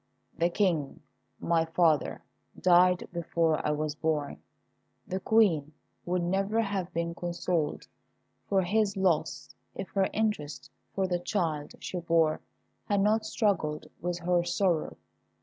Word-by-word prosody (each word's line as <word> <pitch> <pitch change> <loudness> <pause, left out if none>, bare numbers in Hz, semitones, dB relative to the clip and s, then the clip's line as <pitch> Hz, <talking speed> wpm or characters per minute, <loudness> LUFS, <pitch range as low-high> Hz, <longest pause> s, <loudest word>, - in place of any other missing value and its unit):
The 170 +1 +2
King, 170 -7 0 0.4
my 165 -1 +2
father, 160 -3 +1 0.4
died 180 0 +4
before 165 -2 0
I - - 0
was 150 0 -1
born. 150 -2 -2 0.6
The 185 - -3
Queen 175 -9 +3 0.3
would 180 0 0
never 195 +5 0
have 200 -5 -1
been 170 0 -2
consoled 170 -2 -2 0.6
for 195 -2 +2
his 205 +2 +1
loss 170 -5 0 0.2
if 190 - -5
her 190 0 +1
interest 210 -10 -2 0.2
for 195 - +1
the 180 -1 0
child 165 -6 -2
she 180 - -4
bore 165 -2 +2 0.4
had 200 -1 +1
not 215 +2 +2
struggled 170 -10 0 0.2
with 175 +1 -2
her 175 0 +1
sorrow. 175 -1 0
175 Hz, 130 wpm, -29 LUFS, 160-195 Hz, 0.6 s, died